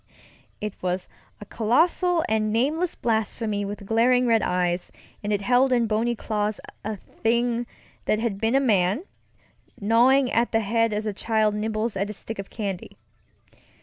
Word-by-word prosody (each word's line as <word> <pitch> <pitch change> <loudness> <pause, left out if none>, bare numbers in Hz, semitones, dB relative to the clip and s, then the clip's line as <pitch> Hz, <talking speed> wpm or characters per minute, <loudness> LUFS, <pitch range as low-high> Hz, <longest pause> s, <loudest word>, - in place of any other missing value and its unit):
It 210 -1 -4
was 180 0 -2 0.3
a 210 - -9
colossal 325 - +2
and 215 -1 +1
nameless 300 +10 0
blasphemy 220 -2 -1
with 200 0 -6
glaring 245 +4 +3
red 230 -2 +3
eyes, 180 0 -1 0.3
and 205 - -2
it 205 -1 0
held 250 +4 +3
in 240 -2 +3
bony 225 +2 0
claws 210 -1 -2 0.2
a 215 +1 -3
thing 235 +4 -1 0.4
that 215 - +2
had 215 -3 -2
been 225 +3 +2
a - - +6
man, 210 - +2 0.8
gnawing 245 +5 +4
at 235 +1 +1
the 225 - +3
head 230 +2 +1
as 210 +1 -2
a 210 - -1
child 215 0 +1
nibbles 215 +1 -2
at 200 +2 -1
a - - -4
stick 220 +1 -6
of 195 - -6
candy. 200 -5 -5
220 Hz, 160 wpm, -25 LUFS, 205-240 Hz, 0.8 s, a